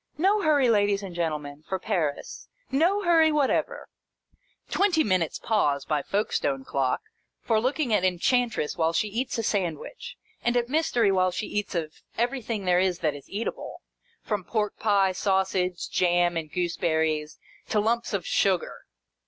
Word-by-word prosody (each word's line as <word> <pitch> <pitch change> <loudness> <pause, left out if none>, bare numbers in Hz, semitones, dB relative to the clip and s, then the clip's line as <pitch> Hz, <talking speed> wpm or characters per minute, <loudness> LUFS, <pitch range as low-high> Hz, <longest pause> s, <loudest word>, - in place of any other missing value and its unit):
No 395 +6 +3
hurry, 295 -6 +3
ladies 205 -3 +2
and 190 -3 -7
gentle 165 -3 -1
men, 145 0 -10
for 190 - 0
Paris. 175 -8 -3 0.2
No 350 +9 +2
hurry 325 -3 +5
whatever! 300 - 0 0.4
" - - -40
Twenty 365 -5 +3
minutes' 185 -5 0
pause, 145 -11 0
by 150 -2 0
Folkestone 140 -8 -1
clock, 135 -2 0 0.4
for 225 -2 +2
looking 260 0 0
at 200 - +3
Enchantress 200 - +1
while 165 -1 +1
she 210 - +1
eats 235 +6 -2
a 230 - -1
sandwich, 190 - -3 0.3
and 240 +1 +2
at 240 0 0
Mystery 250 -8 +2
while 185 -1 +3
she 180 +4 -4
eats 205 -2 -3
of 155 -2 -4 0.2
everything 235 -4 -2
there 180 0 +3
that 165 -4 -1
is 145 -1 -12
eatable, 210 +4 -5 0.4
from 205 -3 -2
pork 210 +1 -1
pie, 200 -3 +3
sausage, 190 -1 0
jam, 175 -1 +2
and 160 -2 -4
gooseberries, 160 -3 -1 0.3
to 215 - +2
lumps 235 +3 0
of 195 -5 -2
sugar. 190 -4 0
195 Hz, 155 wpm, -26 LUFS, 170-240 Hz, 0.4 s, hurry